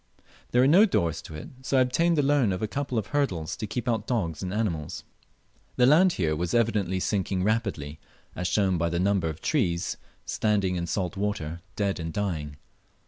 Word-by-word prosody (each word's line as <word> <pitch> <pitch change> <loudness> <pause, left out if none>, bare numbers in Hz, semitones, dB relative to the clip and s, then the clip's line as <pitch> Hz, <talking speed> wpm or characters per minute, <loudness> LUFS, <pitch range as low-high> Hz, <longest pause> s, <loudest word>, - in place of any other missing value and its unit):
There 125 - +3
were 130 - +5
no 190 +9 +7
doors 85 - 0
to 80 - -10
it, 75 - -8
so 135 +1 0
I - - +6
obtained 165 +7 +2
the 145 - +3
loan 135 -6 +3
of 90 +2 -3
a - - +1
couple 135 +1 -3
of 110 - 0
hurdles 95 - 0
to 110 - -5
keep 120 +4 -4
out 110 -3 0
dogs 85 - -1
and 90 - -3
other 105 +3 0
animals. 80 -9 -3 0.7
The 125 - +4
land 170 +7 +6
here 80 -4 0
was 85 +5 -1
evidently 105 -6 +1
sinking 95 -1 -1
rapidly, 100 -9 -1 0.4
as 90 - -2
shown 95 -4 +2
by 85 +1 +1
the 85 +1 -1
number 95 -3 +1
of 80 - -7
trees 90 - 0 0.3
standing 100 -4 +1
in 85 -1 -2
salt 95 +2 -2
water 85 -5 -3
dead 100 -2 -1
and 80 0 -4
dying. 80 -8 -3
100 Hz, 200 wpm, -27 LUFS, 85-120 Hz, 0.7 s, no